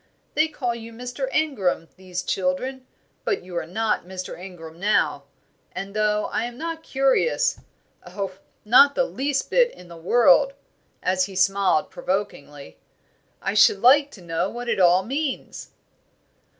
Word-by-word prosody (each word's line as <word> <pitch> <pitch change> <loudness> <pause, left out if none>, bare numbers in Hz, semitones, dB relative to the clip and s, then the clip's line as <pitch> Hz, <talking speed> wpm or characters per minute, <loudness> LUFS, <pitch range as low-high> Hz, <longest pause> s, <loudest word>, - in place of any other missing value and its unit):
They 310 +1 +3
call 260 -6 -3
you 230 0 -9
Mr. 250 +3 -5
Ingram, 220 - 0
these 180 -1 -6
children, 255 +8 -2 0.4
but 440 -5 -1
you 180 -1 -10
are 170 -2 -3
not 220 +5 -1
Mr. 185 +1 -7
Ingram 170 -3 -11
now; 210 +3 +1 0.5
and 195 +1 -6
though 210 0 +1
I - - -1
am 240 0 -7
not 330 +2 -5
curious 275 - +1 0.5
oh, 195 -2 -4 0.3
not 275 +6 +6
the - - +2
least 275 - -2
bit - - +4
in 180 -1 -15
the 170 - -11
world!" 265 - +4 0.5
as 185 0 +2
he 195 -1 -10
smiled, 195 +1 +2
provokingly; 145 - -4 0.6
"I 195 - -1
should 205 -1 +5
like 280 +3 +6
to 190 - -13
know 165 +3 -1
what 240 +2 -7
it 235 - 0
all 180 +1 +5
means." 275 +5 -4
210 Hz, 150 wpm, -23 LUFS, 185-270 Hz, 0.6 s, not